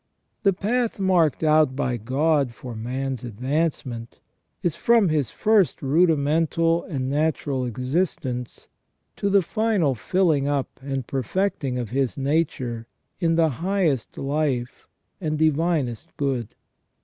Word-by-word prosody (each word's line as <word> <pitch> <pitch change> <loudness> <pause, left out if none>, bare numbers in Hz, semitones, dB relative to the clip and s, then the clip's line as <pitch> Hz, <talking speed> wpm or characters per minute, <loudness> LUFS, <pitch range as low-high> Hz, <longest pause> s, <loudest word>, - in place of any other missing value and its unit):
The 200 - +4
path 230 +5 -1
marked 180 -7 +2
out 155 -3 +4
by 125 -3 -1
God 135 +2 +1
for 125 -1 -8
man's 130 +2 -3
advancement 125 0 -3 0.4
is 170 -3 0
from 230 0 +4
his 150 -5 +1
first 215 -4 +2
rudimental 165 +2 +2
and 135 -6 -3
natural 145 -2 0
existence 125 - -2 0.5
to 200 - 0
the 200 -1 +4
final 210 -8 +1
filling 155 - +1
up 145 -2 -2
and 135 -2 -3
perfecting 135 - -1
of 120 -4 -4
his 135 0 0
nature 135 -5 -1 0.3
in 165 -2 +2
the 165 -1 +4
highest 175 - 0
life 135 -3 -2 0.3
and 155 -3 -1
divinest 155 -6 +1
good. 130 -6 -2
145 Hz, 120 wpm, -24 LUFS, 130-170 Hz, 0.5 s, The